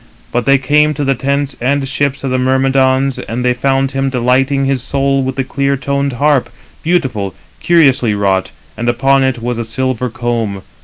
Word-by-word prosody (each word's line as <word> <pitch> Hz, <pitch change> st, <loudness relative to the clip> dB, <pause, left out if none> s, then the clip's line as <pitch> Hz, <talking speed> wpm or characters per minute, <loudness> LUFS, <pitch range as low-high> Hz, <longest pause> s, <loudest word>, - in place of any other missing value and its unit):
But 120 Hz, -, -1 dB
they 140 Hz, 0 st, +6 dB
came 150 Hz, +3 st, +2 dB
to 145 Hz, -, -2 dB
the 135 Hz, 0 st, +2 dB
tents 140 Hz, +2 st, -2 dB
and 135 Hz, +2 st, 0 dB
ships 140 Hz, +1 st, -1 dB
of 135 Hz, -, -2 dB
the 130 Hz, -, +1 dB
Myrmidons, 130 Hz, +1 st, +2 dB
and 120 Hz, +3 st, -4 dB
they 125 Hz, -, +3 dB
found 135 Hz, +1 st, 0 dB
him 135 Hz, 0 st, -1 dB
delighting 130 Hz, +2 st, +1 dB
his 135 Hz, -2 st, 0 dB
soul 135 Hz, +1 st, 0 dB
with 130 Hz, 0 st, -3 dB
his 135 Hz, -, -1 dB
clear 140 Hz, +1 st, -1 dB
toned 140 Hz, +1 st, -1 dB
harp, 140 Hz, -1 st, +1 dB, 0.3 s
beautiful, 125 Hz, -, -1 dB, 0.2 s
curiously 135 Hz, -10 st, +3 dB
wrought, 95 Hz, -2 st, 0 dB, 0.3 s
and 120 Hz, +1 st, -1 dB
upon 135 Hz, +3 st, +2 dB
it 130 Hz, -3 st, -1 dB
was 120 Hz, -1 st, -2 dB
a -, -, -1 dB
silver 125 Hz, +2 st, -2 dB
comb. 115 Hz, -4 st, -3 dB
130 Hz, 185 wpm, -14 LUFS, 125-140 Hz, 0.3 s, they